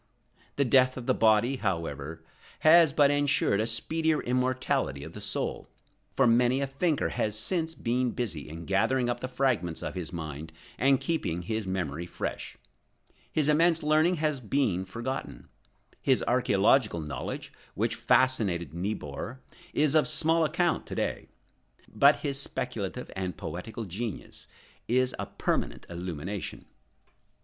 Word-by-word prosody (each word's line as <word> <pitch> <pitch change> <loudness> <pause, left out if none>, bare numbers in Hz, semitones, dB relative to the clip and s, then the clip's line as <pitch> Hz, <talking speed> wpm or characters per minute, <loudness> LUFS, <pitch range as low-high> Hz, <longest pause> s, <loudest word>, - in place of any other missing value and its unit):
The 140 - +2
death 130 +1 +4
of 125 - -6
the - - +3
body, 115 +4 +3
however, 80 - -3 0.4
has 160 0 +7
but 145 -1 +4
ensured 145 -7 +2
a 110 - 0
speedier 155 +7 0
immortality 125 - 0
of - - -9
the - - -9
soul; - - -3 0.5
for 135 - +4
many 120 +2 +4
a 140 - 0
thinker 145 +3 0
has 105 -1 -1
since 165 - -1
been 125 +2 0
busy 95 - -4
in 80 +2 -8
gathering 120 +5 +2
up 120 - -4
the 130 - -4
fragments 120 -11 -1
of - - -4
his 90 -3 -5
mind 80 -2 -6 0.3
and 135 0 +4
keeping 90 - -2
his 110 +2 -3
memory 85 -3 -3
fresh. - - -5 0.7
His 150 -2 +1
immense 165 +2 +3
learning 155 +4 +3
has 150 -3 0
been 110 -6 0
forgotten. 120 +7 -5 0.5
His 130 -2 +2
archæological 105 - +3
knowledge, 75 - -5 0.2
which - - 0
fascinated 95 - +2
Niebuhr, 95 - -4 0.3
is 150 -1 +2
of 155 -1 +4
small 165 +1 +3
account 170 +3 0
to - - -6
day. - - -2 0.6
But 140 +1 +4
his 140 -2 -1
speculative 125 -3 -4
and 95 -1 -3
poetical 90 +8 -6
genius 105 +3 -6 0.4
is 130 +1 +2
a - - -3
permanent - - -2
illumination. 90 +2 -5
120 Hz, 140 wpm, -28 LUFS, 95-140 Hz, 0.7 s, has